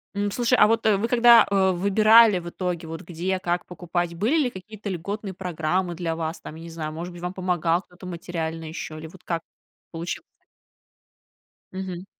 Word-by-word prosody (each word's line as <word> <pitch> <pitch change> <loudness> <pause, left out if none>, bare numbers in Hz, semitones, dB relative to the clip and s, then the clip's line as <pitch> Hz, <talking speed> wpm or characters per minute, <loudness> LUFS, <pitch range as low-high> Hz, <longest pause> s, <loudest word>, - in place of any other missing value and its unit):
М, 205 0 0
слушай, 245 +2 +2
а - - +7
вот, 225 0 +1
э, 210 -2 +5
вы 225 +4 0
когда, 235 -1 +7
э, 190 -1 +3
выбирали 215 +2 +6
в 175 0 -7
итоге, 175 -2 -3
вот 165 0 -6
где, 180 +3 -2
как 175 0 -1
покупать, 175 0 -3
были 230 - +1
ли 250 - 0
какие-то 205 +1 -8
льготные 195 +3 -4
программы 175 0 -1
для 165 -2 -2
вас 160 +1 -3
там, 155 - -9
я 165 - -10
не 170 - -8
знаю, 155 -2 -5
может 175 +2 -6
быть, 175 - -10
вам 180 +1 -3
помогал 175 -2 +1
кто-то 180 +1 -15
материально 165 -2 -4
ещё 155 -1 -6
или 160 +1 -7
вот 180 +2 -15
как 170 -1 -2 0.5
получилось? 170 - -5 1.5
Мгм. 185 -1 -6
180 Hz, 185 wpm, -25 LUFS, 170-200 Hz, 1.5 s, а